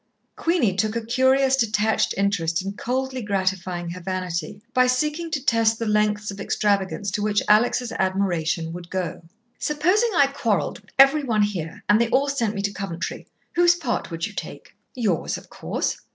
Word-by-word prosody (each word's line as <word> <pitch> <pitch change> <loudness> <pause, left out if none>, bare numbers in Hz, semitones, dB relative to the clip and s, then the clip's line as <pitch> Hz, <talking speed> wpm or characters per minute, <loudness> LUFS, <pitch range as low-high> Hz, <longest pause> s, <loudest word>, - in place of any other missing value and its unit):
Queenie 330 - +1
took 215 +2 0
a 230 -1 -3
curious, 260 +2 +3
detached 220 -3 +1
interest 185 -3 0
in 195 - -3
coldly 260 +4 -2
gratifying 185 -4 -2
her 180 +1 -7
vanity, 180 -1 -3
by 255 0 +4
seeking 300 +6 0
to 285 -4 -3
test 225 -2 +3
the 230 - -3
lengths 210 -1 +1
of 195 - -9
extravagance 200 -1 0
to 205 - -2
which 210 0 +1
Alex' 245 +3 +3
admiration 175 -4 0
would 175 0 -8
go. 185 -3 -3 0.4
"Supposing 360 +10 +2
I 285 - +6
quarrelled 230 - -1
with 205 - -24
every 275 +2 +6
one 220 -5 +2
here, 175 -6 -4
and 210 +2 +5
they 235 - +1
all 275 +3 +2
sent 230 -6 -1
me 200 - -3
to 200 0 -1
Coventry 190 -5 -5 0.3
whose 345 0 +5
part 265 -8 -3
would 165 -1 -3
you 210 - -7
take?" - - -8 0.2
"Yours, 210 -10 0
of - - -15
course." - - -2
210 Hz, 175 wpm, -23 LUFS, 190-255 Hz, 0.4 s, I